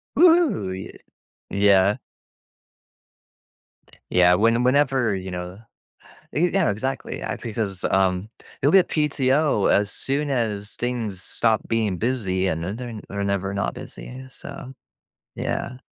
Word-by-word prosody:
Woo-hoo! 330 - +4
Y 95 - -8 0.5
Yeah. 100 +2 +4 2.1
Yeah, 90 0 +5
when 115 +4 +3
whenever, 130 -4 +3
you 95 0 -5
know 90 +2 -6 0.7
Ye 175 +4 +2
yeah, 190 -4 +2
exactly, 130 +6 -4
a - - -3
because, 105 -4 -3
um, 95 +1 +1 0.3
you'll 145 +3 +4
get 190 -2 +6
PTO 140 -5 +2
as 100 0 +3
soon 145 +2 -2
as 110 -5 -2
things 115 -6 -3
stop 110 -2 0
being 110 -5 0
busy, 95 -6 0
and 80 -1 -2
I - - -3
know - - -5
they're 120 -1 -6
not 105 - -8
they're 100 0 -3
never 100 -1 -1
not 100 - -1
busy, 130 +1 -9
so 135 0 -9 0.6
Yeah. 125 +1 -3
110 Hz, 130 wpm, -23 LUFS, 95-130 Hz, 2.1 s, get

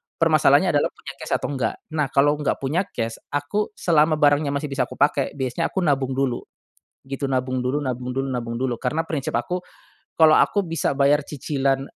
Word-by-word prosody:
Permasalahannya 155 +1 +4
adalah 145 -2 +2
punya 140 - -9
cash - - -4
atau - - -2
enggak? 130 -5 -1 0.2
Nah, 150 -2 0
kalo 145 +2 +2
enggak 150 - 0
punya 165 +8 0
cash 115 -1 -4 0.2
aku 175 +9 -1
selama 155 -2 +3
barangnya 145 0 +3
masih 140 0 -3
bisa 135 - 0
aku - - -10
pake 145 -1 +1
biasanya 135 +4 -1
aku 190 - -2
nabung 135 -4 +1
dulu, 130 -3 0 0.7
gitu. 140 +1 -4
Nabung 130 -1 -1
dulu 135 +4 0
nabung 125 -2 -3
dulu 135 +1 -2
nabung 120 -2 -3
dulu 130 -2 -1
karena 155 +7 -1
prinsip 145 -4 -3
aku, 175 +10 -2 0.5
kalau 160 -1 +7
aku 200 +4 +3
bisa 165 -4 -1
bayar 145 +2 +4
cicilan, 135 -1 -1
140 Hz, 185 wpm, -23 LUFS, 130-155 Hz, 0.7 s, kalau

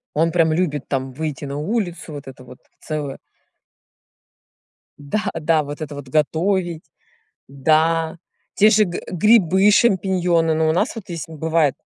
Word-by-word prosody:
Он 165 +2 +2
прям 165 -2 +2
любит, 155 -5 -1
там, 135 -1 -2
выйти 150 -1 -4
на 140 +1 -5
улицу. 175 -2 -3
Вот 145 -1 -9
это 130 -1 -11
вот 125 0 -14 0.2
целое 150 -3 -5 1.8
Да, 145 +8 -2
да, 155 -1 +2
вот 145 +2 -8
это 150 -1 -6
вот 140 -2 -9
готовить. 170 +3 0 0.7
Да. 160 +4 +1 0.4
Те 215 +2 +5
же 215 0 +5
г 175 -2 -5
грибы 195 0 +4
шампиньоны. 185 -6 +2
Ну, 160 0 +1
у - - +3
нас 205 +10 0
вот 225 - -7
если 165 -1 -6
бывает 160 -2 +1
160 Hz, 145 wpm, -20 LUFS, 150-180 Hz, 1.8 s, Те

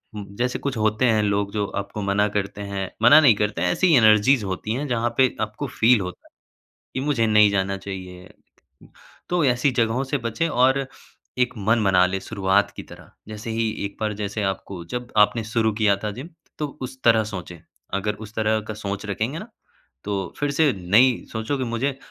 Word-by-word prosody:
Who 105 - -5
जैसे 125 +1 -1
कुछ 140 -2 -3
होते 110 +3 +1
हैं, 110 -3 +3
लोग 100 -1 0
जो 105 -1 0 0.2
आपको 100 +1 -7
मना 100 +1 +1
करते 100 0 -3
हैं, 100 -2 -4
मना 120 +6 +9
नहीं 130 -8 +6
करते 105 -3 -1
हैं 90 - +2
ऐसी 185 - +2
एनर्जीज़ 110 +1 +5
होती 95 +3 -3
हैं, 145 +4 -3
जहाँ 120 -1 0
पे 130 -2 +3
आपको 110 +6 -3
फ़ील 115 -1 +3
होता 90 -1 -8
है, - - -67 0.6
कि - - -2
मुझे 135 -5 +1
नहीं 105 -1 +5
जाना 95 -1 0
चाहिए। 95 -2 -8 1.0
तो 175 -3 +2
ऐसी 125 +2 +2
जगहों 115 +3 +1
से 140 +1 -2
बचें 165 +9 -1
और 130 -1 +2 0.5
एक 125 -1 +1
मन 110 +2 +1
बना 90 -2 +4
लें 95 +1 -2
शुरुआत 100 -1 +1
की - - -6
तरह, - - -14 0.2
जैसे 110 +1 -7
ही, 115 0 0 0.2
एक 100 - -10
बार 110 -1 -1
जैसे 105 +1 -3
आपको 95 -2 -8
जब 125 0 -5
आपने 115 +1 -4
शुरू 110 0 0
किया 100 -2 +4
था 105 - -1
जिम 150 +7 -8 0.3
तो 150 - -1 0.2
उस 130 0 -7
तरह 115 -2 +5
सोचें, 90 -3 -7 0.4
अगर 100 +2 -1
उस 105 - -17
तरह 110 0 +1
का 110 - -4
सोच 100 -1 -5
रखेंगे 110 +9 -2
ना, 215 +6 -9 0.6
तो 100 -1 -3
फिर 145 -1 0
से 145 0 +3
नई 110 +8 +3
सोचो 110 +5 -2
कि 130 - -2
मुझे 125 +4 -2
110 Hz, 200 wpm, -23 LUFS, 100-125 Hz, 1.0 s, मना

